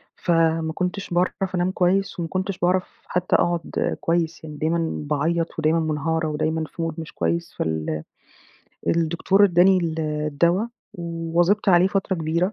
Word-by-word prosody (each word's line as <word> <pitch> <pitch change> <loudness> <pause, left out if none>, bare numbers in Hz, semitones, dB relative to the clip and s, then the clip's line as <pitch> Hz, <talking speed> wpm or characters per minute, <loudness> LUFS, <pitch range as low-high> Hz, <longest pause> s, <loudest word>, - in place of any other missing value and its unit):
فما 165 -1 +1
كنتش 180 +3 -3
باعرف 185 +1 0
أنام 180 +1 +1
كويس 190 +1 +1
وما 170 - -2
كنتش 190 +2 -2
باعرف 180 +1 0
حتى 180 0 0
أقعد 175 -1 0
كويس 165 -1 0
يعني، 155 -2 -8
دايمًا 160 +2 0 0.2
باعيط 165 +3 0
ودايمًا 160 +1 +2
منهارة 160 +1 -1
ودايمًا 155 +1 -1
في 165 - -6
mood 165 0 -6
مش 160 - -8
كويس، 170 0 -1
فال 80 -1 -2 0.8
الدكتور 170 +4 +3
إدّاني 185 0 +5
ال 165 -2 -2
الدوا، 155 +6 +1 0.3
واظبت 170 +4 0
عليه 180 -1 +6
فترة 195 0 0
كبيرة، 170 +4 0
170 Hz, 145 wpm, -23 LUFS, 160-180 Hz, 0.8 s, عليه